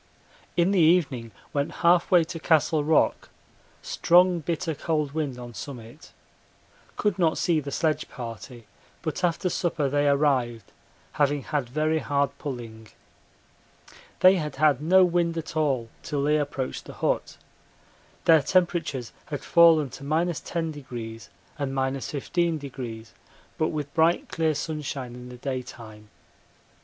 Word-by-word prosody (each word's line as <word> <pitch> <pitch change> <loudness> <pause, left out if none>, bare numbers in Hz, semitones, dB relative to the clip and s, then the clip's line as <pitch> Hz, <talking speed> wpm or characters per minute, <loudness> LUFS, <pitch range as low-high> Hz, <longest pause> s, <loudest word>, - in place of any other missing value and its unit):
In 175 +2 +3
the 195 - +3
evening 155 -8 +3 0.2
went 140 0 -1
half 175 0 +5
way 175 -2 +6
to 165 +1 -7
Castle 155 -1 +2
Rock; 155 +1 +2 0.5
strong 180 0 +4
bitter 165 +1 -2
cold 150 -1 -1
wind 145 -4 -3
on 120 -1 -9
summit. 120 +4 -9 0.9
Could 205 -3 0
not 165 -3 +2
see 165 -3 +2
the 140 -1 -6
sledge 155 +2 -1
party, 115 0 -8 0.4
but 160 +2 -3
after 175 +1 +1
supper 165 -4 0
they 145 +1 +1
arrived, 130 -7 +1 0.4
having 145 -1 +1
had 145 -5 -2
very 155 +4 +1
hard 140 -2 0
pulling. 115 -6 -7 1.3
They 185 +1 +7
had 150 -4 -4
had 145 -1 +3
no 185 +4 +5
wind 170 -1 0
at 160 0 -5
all 135 -7 0
till 145 -2 -2
they 150 +1 +3
approached 140 -3 -4
the - - -9
hut. - - -2 0.9
Their 160 -2 +6
temperatures 165 -7 0 0.2
had 145 -2 -5
fallen 165 -5 +5
to 140 - -10
10° 145 - -3 0.3
and 140 -2 -2
15°, 135 -3 -3 0.5
but 155 - +2
with 150 -3 -4
bright 165 +1 +2
clear 160 -2 0
sunshine 140 -5 -4
in 125 0 -10
the 125 - -10
daytime. 120 -5 -7
145 Hz, 130 wpm, -26 LUFS, 130-165 Hz, 1.3 s, They